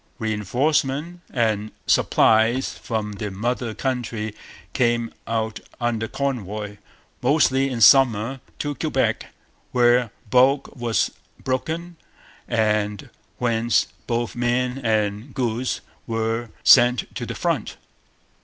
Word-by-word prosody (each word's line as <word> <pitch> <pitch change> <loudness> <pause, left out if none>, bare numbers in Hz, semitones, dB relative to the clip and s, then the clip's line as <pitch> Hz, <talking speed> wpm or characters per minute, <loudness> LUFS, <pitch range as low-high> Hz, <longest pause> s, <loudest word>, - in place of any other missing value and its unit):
Reinforcements 135 - 0
and 110 -3 0
supplies 115 +4 +3
from 110 -2 -3
the 105 +1 -5
mother 115 +3 -2
country 115 -5 -3 0.4
came 120 -2 +1
out 110 -1 -2 0.2
under 115 -2 -1
convoy, 105 -6 -3 0.4
mostly 135 0 +3
in 120 -3 -4
summer, 125 +1 +5 0.2
to 145 0 -2
Quebec, 135 - -1 0.4
where 120 -1 +4 0.2
bulk 130 +5 +3
was 120 -3 0 0.3
broken, 160 +6 -3 0.5
and 105 -3 0 0.3
whence 115 -1 +1 0.2
both 120 -4 -1
men 125 +2 0
and 110 +1 -1
goods 125 -1 -1 0.3
were 115 0 -1
sent 120 -1 +5
to - - -5
the - - -5
front. - - -2
120 Hz, 100 wpm, -23 LUFS, 110-130 Hz, 0.5 s, summer